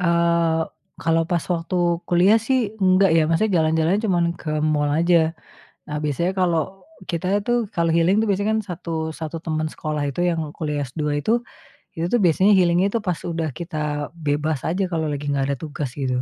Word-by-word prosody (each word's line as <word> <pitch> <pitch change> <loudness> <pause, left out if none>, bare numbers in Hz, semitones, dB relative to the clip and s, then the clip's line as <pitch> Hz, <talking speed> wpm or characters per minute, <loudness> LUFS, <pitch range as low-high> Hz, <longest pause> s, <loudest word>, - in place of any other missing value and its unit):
Eee, 170 -1 +2 0.4
kalau 165 0 +2
pas 170 -2 +1
waktu 170 +2 -2 0.3
kuliah 185 +5 +5
sih, 235 -3 0
enggak 185 0 +5
ya, 160 - +4
maksudnya 195 +5 +1
jalan-jalannya 160 +6 +1
cuman 175 -3 +2
ke 155 - -6
mall 150 -1 +1
aja. 165 0 +3 0.5
Nah, 150 0 -3
biasanya 160 +5 0
kalau 185 +1 0 0.3
kita 185 +4 -1
tuh 240 -3 +1
kalau 170 -5 0
healing 175 +5 +3
itu, - - 0
biasanya 200 +2 +1
kan - - 0
1, 165 -3 -4
1 160 0 -5
teman 155 -1 -2
sekolah 155 -2 -3
itu 140 +5 -2
yang 170 -2 +1 0.2
kuliah 150 -3 -2
S2 145 +2 -2
itu, 235 +6 +1 0.6
itu 165 - -1
tuh 245 - +3
biasanya 185 +4 +4
healing 175 0 +3
itu 215 +3 0
pas 180 -6 -2
udah 165 -2 -2
kita 150 -4 -3
bebas 150 -2 -1
aja, 185 +4 0
kalau 160 -2 -1
lagi 145 0 -3
nggak 140 -1 0
ada - - -2
tugas 150 -3 -4
gitu, 130 -2 -1
165 Hz, 180 wpm, -22 LUFS, 155-185 Hz, 0.6 s, kuliah